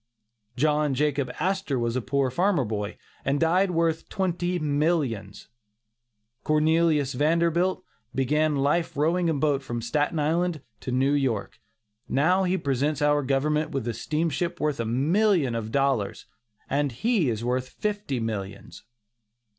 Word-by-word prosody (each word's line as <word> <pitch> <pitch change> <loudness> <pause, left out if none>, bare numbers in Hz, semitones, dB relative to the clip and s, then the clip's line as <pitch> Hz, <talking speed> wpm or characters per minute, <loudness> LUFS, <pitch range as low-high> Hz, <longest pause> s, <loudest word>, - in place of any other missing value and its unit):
John 150 0 +2
Jacob 140 -2 0
Astor 185 -5 0
was 120 0 -1
a 130 - 0
poor 130 +1 0
farmer 175 -1 +2
boy, 105 -1 -4 0.3
and 140 +1 0
died 180 +4 +3
worth 165 -2 0
twenty 180 -2 -1
millions. 145 - -1 1.0
Cornelius 155 -2 +2
Vanderbilt 170 +6 +1 0.3
began 150 +3 +1
life 150 +3 0
rowing 165 +4 +2
a - - +2
boat 140 -1 +1
from 120 -3 -4
Staten 145 +8 -1
Island 160 +1 0 0.2
to 130 - -5
New 135 +3 +2
York; 115 -6 -1 0.5
now 180 +7 +3
he 185 +1 +1
presents 145 0 0
our 145 0 +3
government 150 +3 0
with 135 -6 -3
a 120 - -1
steamship 160 +7 -2
worth 150 -3 -1
a 115 - -1
million 155 - +2
of 110 -1 -4
dollars, 135 -7 0 0.4
and 140 0 0
he 195 - +1
is 110 -1 -2
worth 130 +1 -1
fifty 205 -11 -3
millions. 100 -3 -5
145 Hz, 140 wpm, -26 LUFS, 130-165 Hz, 1.0 s, died